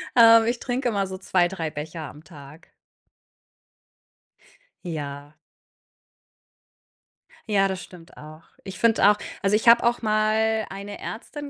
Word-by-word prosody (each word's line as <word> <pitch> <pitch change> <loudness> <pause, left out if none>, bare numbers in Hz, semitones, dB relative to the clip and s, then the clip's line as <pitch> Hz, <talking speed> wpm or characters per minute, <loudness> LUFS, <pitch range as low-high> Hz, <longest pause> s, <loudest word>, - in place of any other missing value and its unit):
Ähm, 230 -1 +7
ich 240 0 -1
trinke 250 0 -2
immer 200 -3 -1
so 190 0 -7
2, 180 -2 +1
3 165 -4 -5
Becher 155 +2 -7
am 150 +1 -11
Tag. 150 -1 -15 2.2
Ja. 145 -3 -7 2.1
Ja, 195 -2 +2
das 190 -1 -5
stimmt 170 -2 -15
auch. 155 +2 -13 0.2
Ich 195 -1 -9
finde 225 -3 +4
auch 210 - +3 0.2
also, 195 +1 +2
ich 225 +2 -1
habe 235 +1 +7
auch 240 +1 +1
mal 220 0 +1
eine 200 +1 -8
Ärztin 290 +5 -8
195 Hz, 130 wpm, -24 LUFS, 160-220 Hz, 2.2 s, Ähm